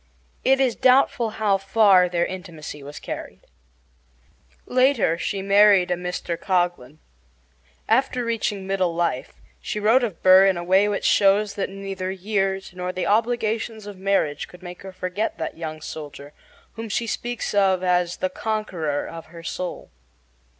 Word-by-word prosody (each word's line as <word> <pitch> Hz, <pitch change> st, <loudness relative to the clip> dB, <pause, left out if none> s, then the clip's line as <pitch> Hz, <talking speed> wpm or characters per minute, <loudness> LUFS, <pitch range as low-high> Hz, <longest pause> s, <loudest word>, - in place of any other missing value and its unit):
It 270 Hz, +1 st, +4 dB
is 260 Hz, -3 st, +2 dB
doubtful 255 Hz, -3 st, +3 dB
how 205 Hz, -3 st, +2 dB
far 195 Hz, -2 st, +4 dB
their 175 Hz, -1 st, +1 dB
intimacy 170 Hz, -6 st, -8 dB
was 145 Hz, +1 st, -9 dB
carried. -, -, -7 dB, 1.2 s
Later 255 Hz, -, +2 dB
she 195 Hz, +3 st, -3 dB
married 200 Hz, -2 st, +5 dB
a -, -, +4 dB
Mr. 180 Hz, -1 st, -4 dB
Coghlan. 175 Hz, -8 st, -1 dB, 0.9 s
After 250 Hz, +1 st, +1 dB
reaching 215 Hz, -4 st, -2 dB
middle 190 Hz, -3 st, 0 dB
life 170 Hz, -7 st, -2 dB, 0.3 s
she 210 Hz, -, -4 dB
wrote 225 Hz, +5 st, +4 dB
of 215 Hz, -8 st, -4 dB
Burr 185 Hz, +1 st, +8 dB
in 190 Hz, -2 st, +2 dB
a 175 Hz, -, -4 dB
way 190 Hz, +3 st, +4 dB
which 205 Hz, -, -2 dB
shows 200 Hz, +1 st, +3 dB
that 200 Hz, -, -3 dB
neither 195 Hz, -1 st, -5 dB
years 195 Hz, 0 st, -2 dB
nor 180 Hz, 0 st, -4 dB
the 185 Hz, 0 st, -3 dB
obligations 220 Hz, 0 st, 0 dB
of 205 Hz, -1 st, -8 dB
marriage 190 Hz, -7 st, 0 dB
could 180 Hz, 0 st, -16 dB
make 180 Hz, 0 st, -9 dB
her 190 Hz, -, -9 dB
forget 185 Hz, +3 st, -3 dB
that 160 Hz, -, -4 dB
young 155 Hz, -1 st, -6 dB
soldier, 145 Hz, -2 st, -8 dB, 0.4 s
whom 225 Hz, -1 st, -7 dB
she 230 Hz, +3 st, -1 dB
speaks 240 Hz, 0 st, -3 dB
of 190 Hz, -2 st, +2 dB
as 180 Hz, -1 st, +1 dB
"the 185 Hz, -, -1 dB
conqueror 185 Hz, -10 st, -2 dB
of 165 Hz, 0 st, -9 dB
her 165 Hz, +1 st, -12 dB
soul." 180 Hz, +1 st, -5 dB
190 Hz, 155 wpm, -23 LUFS, 175-215 Hz, 1.2 s, Burr